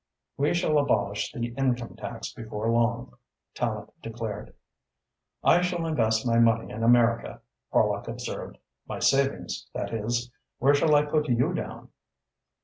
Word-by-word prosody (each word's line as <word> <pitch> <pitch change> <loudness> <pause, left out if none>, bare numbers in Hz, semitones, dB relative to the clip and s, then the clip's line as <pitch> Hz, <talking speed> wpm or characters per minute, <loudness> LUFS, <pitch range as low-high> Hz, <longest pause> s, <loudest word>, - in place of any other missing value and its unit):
"We 145 +4 +1
shall 155 -4 +2
abolish 105 -7 0
the 120 0 -3
income 125 -3 -1
tax 115 -1 -6
before 110 -1 -3
long," 120 +1 0 0.4
Tallente - - -3
declared. 115 -2 -6 0.9
"I 175 - +5
shall 175 -2 -1
invest 110 -8 +1
my 115 -1 +3
money 115 0 +3
in 110 - -5
America," 115 0 +3 0.3
Horlock - - +2
observed, - - -6 0.3
"my - - -4
savings, 135 0 +1
that - - -3
is. 120 +2 -2 0.3
Where 140 +3 +4
shall 150 +1 +4
I 145 0 +4
put 150 0 0
you 120 0 +2
down?" - - -5
120 Hz, 140 wpm, -27 LUFS, 115-145 Hz, 0.9 s, I